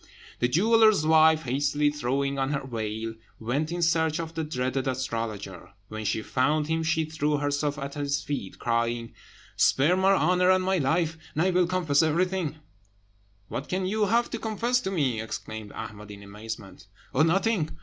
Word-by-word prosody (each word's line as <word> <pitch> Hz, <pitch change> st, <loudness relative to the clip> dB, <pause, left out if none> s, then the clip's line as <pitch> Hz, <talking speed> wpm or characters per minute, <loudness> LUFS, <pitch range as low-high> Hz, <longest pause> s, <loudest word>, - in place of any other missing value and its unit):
The 120 Hz, -, +3 dB
jeweller's 215 Hz, -, +4 dB
wife, 160 Hz, 0 st, +5 dB
hastily 145 Hz, +3 st, +1 dB
throwing 140 Hz, 0 st, -1 dB
on 135 Hz, +2 st, 0 dB
her 140 Hz, -1 st, -3 dB
veil, 110 Hz, -2 st, -4 dB, 0.3 s
went 140 Hz, +8 st, -1 dB
in 175 Hz, 0 st, -1 dB
search 160 Hz, -1 st, +2 dB
of 165 Hz, -1 st, -5 dB
the 165 Hz, -1 st, -2 dB
dreaded 130 Hz, -2 st, -2 dB
astrologer. 115 Hz, -7 st, -4 dB, 0.2 s
When 110 Hz, 0 st, -6 dB
she 110 Hz, +2 st, -1 dB
found 150 Hz, +6 st, +1 dB
him, 160 Hz, +1 st, -1 dB
she 160 Hz, 0 st, +1 dB
threw 150 Hz, -1 st, -1 dB
herself 145 Hz, 0 st, -1 dB
at 140 Hz, -1 st, -5 dB
his 145 Hz, -1 st, -1 dB
feet, 140 Hz, -10 st, -5 dB
crying, 115 Hz, 0 st, -1 dB, 0.4 s
"Spare 150 Hz, +7 st, +3 dB
my 190 Hz, +1 st, +4 dB
honour 180 Hz, -1 st, +3 dB
and 185 Hz, 0 st, +4 dB
my 190 Hz, 0 st, +1 dB
life, 160 Hz, +3 st, 0 dB, 0.2 s
and 155 Hz, -, +2 dB
I 185 Hz, -, +2 dB
will 180 Hz, -1 st, +3 dB
confess 170 Hz, -6 st, +2 dB
everything!" 170 Hz, 0 st, 0 dB, 0.9 s
"What 135 Hz, -, -5 dB
can 185 Hz, +1 st, -1 dB
you 210 Hz, +3 st, +1 dB
have 235 Hz, +3 st, +1 dB
to 230 Hz, -, -3 dB
confess 235 Hz, +3 st, 0 dB
to 190 Hz, -, -3 dB
me?" 135 Hz, -, 0 dB
exclaimed 110 Hz, -1 st, -6 dB
Ahmed 105 Hz, -1 st, -8 dB
in 100 Hz, 0 st, -10 dB
amazement. 105 Hz, 0 st, -9 dB, 0.3 s
"Oh, 135 Hz, -, +2 dB
nothing! 165 Hz, 0 st, +1 dB
150 Hz, 170 wpm, -27 LUFS, 125-175 Hz, 0.9 s, wife